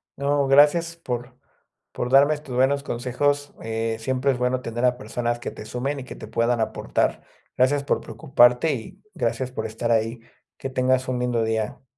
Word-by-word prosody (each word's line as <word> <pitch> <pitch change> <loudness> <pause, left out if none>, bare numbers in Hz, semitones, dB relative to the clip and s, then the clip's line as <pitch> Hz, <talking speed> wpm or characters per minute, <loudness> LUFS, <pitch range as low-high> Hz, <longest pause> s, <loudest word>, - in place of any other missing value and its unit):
No, 140 0 +1
gracias 150 +5 +5
por 125 -5 -5 0.6
por 120 - -3
darme 140 +3 +6
tus 140 -4 -8
buenos 135 +3 +3
consejos, 140 +4 -1
eh, 115 0 -2
siempre 130 +4 0
es 130 - -2
bueno 125 +1 0
tener 120 0 -4
a 125 0 +2
personas 120 -2 -2
que - - -5
te - - -9
sumen 135 +5 -3
y - - -9
que - - -9
te - - -9
puedan 115 +2 +1
aportar. 110 - -1 0.3
Gracias 140 +3 +3
por 140 - 0
preocuparte 130 0 +3
y 135 - -8
gracias 125 +2 -1
por - - -4
estar 115 +2 -2
ahí. 115 +1 +1 0.4
Que 135 - -5
tengas 130 0 +1
un 125 -1 -1
lindo 120 -2 0
día. 110 0 -2
125 Hz, 180 wpm, -24 LUFS, 120-140 Hz, 0.6 s, darme